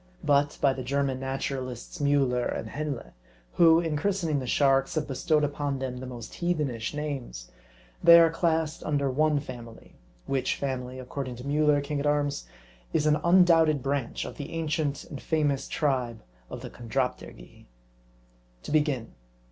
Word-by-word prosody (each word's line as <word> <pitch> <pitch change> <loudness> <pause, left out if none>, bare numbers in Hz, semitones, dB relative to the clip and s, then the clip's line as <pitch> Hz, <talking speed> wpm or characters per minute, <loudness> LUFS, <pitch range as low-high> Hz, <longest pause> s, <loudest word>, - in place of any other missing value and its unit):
But 145 0 +2
by 140 -2 +3
the 130 - -6
German 135 0 -1
naturalists 135 +1 -4
Miiller 135 -4 +2
and 110 - -6
Henle, 150 -4 -4 0.4
who, 165 -1 +6
in 165 -3 -1
christening 165 -2 0
the 130 - -5
sharks, 135 +2 +2
have 155 -1 -1
bestowed 150 +3 +1
upon 145 -1 -1
them 130 -1 -4
the 130 +1 -7
most 120 -2 -8
heathenish 150 -9 -1
names, 135 - -5 0.5
they 170 0 +10
are 165 -1 +5
classed 160 -2 0
under 140 -3 0
one 150 +2 +2
family; 120 -5 -11 0.3
which 135 -1 0
family, 130 -2 -4
according 130 0 -5
to 125 - -10
Miiller, 145 +1 +2
king 145 0 -3
at 145 - -1
arms, 145 -1 0 0.5
is 150 - +2
an 150 0 +4
un 175 +4 +5
doubted 160 -5 +4
branch 135 -3 -2
of - - -8
the 145 - -7
ancient 155 -3 -1
and 140 - -9
famous 145 -4 0
tribe 125 -6 -1 0.3
of - - -7
the - - -8
Chon 120 -1 -11
dropterygii. 125 - -4 1.0
To - - -7
begin. 145 -6 0
140 Hz, 160 wpm, -27 LUFS, 130-155 Hz, 1.0 s, they